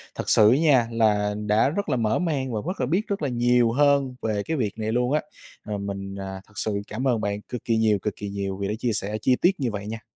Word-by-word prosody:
thật - - -4
sự 105 0 +6
á 130 - +4
nha, 140 -7 +4
là 105 -2 +2
đã 110 +6 +3
rất 200 +6 -3
là - - +2
mở 110 +3 +1
mang 140 -8 -1
và 110 - -1
rất 185 +2 -3
là - - +2
biết 180 - 0
rất 200 -4 -2
là 145 - 0
nhiều 120 -1 +3
hơn 140 -1 +2
về 105 -2 -1
cái 160 +5 -2
việc 110 -4 -2
này 110 0 -1
luôn 125 +3 +1
á. 150 - +2 0.4
Ờ, 105 -1 -3
mình, 100 -1 -5
à, 95 -1 -6
thật - - -23
sự 100 -2 -1
cảm 130 +5 -3
ơn 115 -4 +1
bạn 100 0 -2
cực 125 +2 -7
kỳ 115 -1 +2
nhiều, 110 -2 +3
cực 105 -2 -3
kỳ 100 - -6
nhiều 100 -1 -3
vì 100 - -2
đã 105 - -1
chia 120 -1 0
sẻ 105 +1 -2
chi 130 - +3
tiết 185 -2 +3
như 125 -5 -1
vậy 100 0 -5
nha! 110 +1 -5
115 Hz, 280 wpm, -24 LUFS, 105-130 Hz, 0.4 s, sự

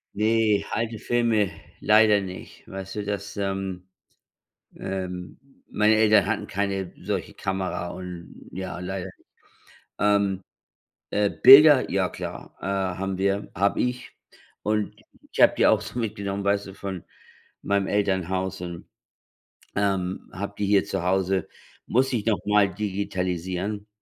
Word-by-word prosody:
Ne, 110 -1 +2
alte 115 -1 -2
Filme 115 -4 +1 0.3
leider 105 -1 +5
nicht. 95 -1 -9
Weißt 95 +1 -7
du, 105 - -2
das, 100 0 -4
ähm 95 -2 -3 0.9
ähm, 90 -2 -5 0.3
meine 105 +1 +3
Eltern 110 -2 +5
hatten - - -1
keine 95 -2 -2
solche - - -3
Kamera 95 -2 -3
und 90 -2 -9
ja, 95 -1 -5
leider. 95 +1 -5 0.9
Ähm. 100 -2 +2 0.7
Äh, 105 -1 +1
Bilder, 140 0 +8
ja - - +1
klar, - - -7
äh, - - -6
haben 95 0 -2
wir 100 +2 -1
habe 100 +3 +1
ich. 125 0 -2 0.5
Und 105 -1 -1 0.4
ich - - -3
habe - - +7
die - - +4
auch 110 - +4
so 110 +3 -7
mitgenommen, 100 -3 -3
weißt 100 0 +1
du, 95 - -10
von 95 -3 -6 0.6
meinem 100 -1 +1
Elternhaus 95 -2 -1
und, 85 -1 -7 0.9
ähm, 95 -2 -1
habe 100 +1 -5
die 105 - -1
hier 100 0 +4
zu 95 -3 -3
Hause. 95 0 +1 0.4
Muss 130 +3 +2
ich 110 -4 -1
nochmal 105 -1 +2
digitalisieren, 95 0 -3
100 Hz, 130 wpm, -25 LUFS, 95-105 Hz, 0.9 s, Bilder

